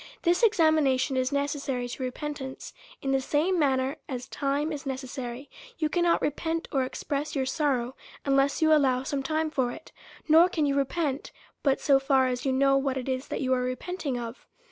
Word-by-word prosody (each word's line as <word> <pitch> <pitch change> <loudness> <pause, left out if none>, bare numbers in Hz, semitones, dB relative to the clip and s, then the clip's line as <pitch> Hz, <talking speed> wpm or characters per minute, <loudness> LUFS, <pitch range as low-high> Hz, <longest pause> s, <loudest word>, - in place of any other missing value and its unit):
This 345 +4 +3
examination 315 - +3
is 255 +1 0
necessary 280 -3 -1
to 245 - -7
repent 290 +3 -4
ance 265 0 -7 0.3
in 270 - 0
the 270 0 +2
same 320 +7 +1
manner 265 -1 +1
as 250 -2 -5
time 285 +2 -1
is 295 -2 -5
necessary; 260 -1 -5 0.3
you 310 - 0
cannot 345 +1 +2
repent 325 +3 -1
or 270 -3 +1
express 285 +3 -3
your 265 -2 0
sorrow, 260 -3 0 0.3
unless 275 +2 +2
you 315 - +4
al 310 - +7
low 260 -2 +2
some 275 +1 -2
time 310 +3 -1
for 260 -5 0
it; 315 - -11 0.4
nor 330 +3 +7
can 315 -4 0
you 280 - +1
repent, 280 0 -1 0.3
but 275 -2 +2
so 275 -2 +4
far 270 -1 +3
as 250 +1 -2
you - - +2
know 275 +1 +3
what 270 -1 0
it 255 - -4
is 260 0 -2
that - - -3
you 260 -1 +1
are 255 - +1
repenting 255 +3 -3
of. 235 0 -7
275 Hz, 195 wpm, -27 LUFS, 260-305 Hz, 0.4 s, al